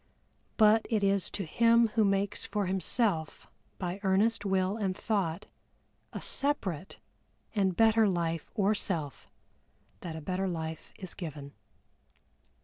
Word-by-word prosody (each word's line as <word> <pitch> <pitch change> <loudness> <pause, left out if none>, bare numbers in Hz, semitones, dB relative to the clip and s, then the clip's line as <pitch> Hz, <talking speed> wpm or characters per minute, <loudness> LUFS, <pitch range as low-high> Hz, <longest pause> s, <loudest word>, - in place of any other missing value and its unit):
But 220 0 +5
it 215 -4 +1
is 195 -1 +2
to 195 - -4
him 230 +6 +4
who 220 0 +2
makes 200 0 0
for 205 -2 -2
himself, 185 -2 -1 0.3
by 180 +1 -4
earnest 205 +3 +2
Will 190 0 +1
and 195 -4 -2
Thought, 195 -6 -1 0.7
a - - -5
separate 195 - -1 0.6
and 190 -4 +1
better 225 -1 +5
Life 165 -3 -2
or 205 -1 +3
Self 165 -8 -3 0.7
that 170 -3 -6
a - - -5
better 185 +4 -2
life 160 -2 -5
is 185 - -7
given. 145 -5 -7
195 Hz, 130 wpm, -30 LUFS, 175-215 Hz, 0.7 s, But